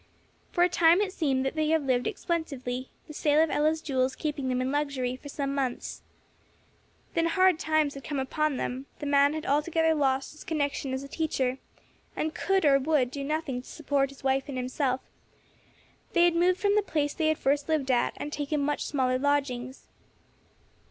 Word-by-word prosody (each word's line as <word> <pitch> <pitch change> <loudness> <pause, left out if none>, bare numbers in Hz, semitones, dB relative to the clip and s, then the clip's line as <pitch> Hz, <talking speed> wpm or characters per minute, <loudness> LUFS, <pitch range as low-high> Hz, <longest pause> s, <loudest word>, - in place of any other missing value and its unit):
For 350 - +3
a - - +6
time 340 0 +4
it 400 -2 -1
seemed 270 -6 0
they 310 +3 0
had 320 -2 +2
lived 250 -2 +1
expensively, 275 - -3 0.2
the 305 - -10
sale 295 0 +2
of 320 0 +3
Ella's 310 +1 +1
jewels 260 -2 0
keeping 290 -4 -3
them 255 0 0
in 255 +1 -1
luxury 280 -4 -1
for 285 +3 -11
some 275 -1 -3
months. 265 -3 -3 1.1
Then 330 0 +2
hard 370 -1 +3
times 310 -2 +1
had 275 - -9
come 290 - -4
upon 280 +2 0
them; 260 +3 -4
the - - -6
man 285 0 +4
had 315 - -5
altogether 320 +3 +2
lost 270 -3 0
his 305 - -12
connection 285 -3 -2
as 265 +1 -3
a - - -8
teacher, 270 -4 -1 0.6
and 315 0 -2
could, 385 -3 +1
or 275 -1 +5
would, 270 -3 +1
do 280 0 -5
nothing 285 -3 -2
to - - -15
support 280 -3 0
his 275 0 -15
wife 270 0 +1
and 275 -3 -5
himself; 255 +1 -1 1.1
they 345 -2 +5
had 345 - +4
moved 360 +2 +3
from 405 -1 +2
the 420 - +4
place 300 -7 -1
they 315 - 0
had 315 -1 +2
first 285 +2 0
lived 290 -4 +1
at, 245 - +2
and 295 - -5
taken 295 +1 -1
much 290 +1 0
smaller 255 -3 +1
lodgings. 270 -3 -1
285 Hz, 190 wpm, -28 LUFS, 265-315 Hz, 1.1 s, a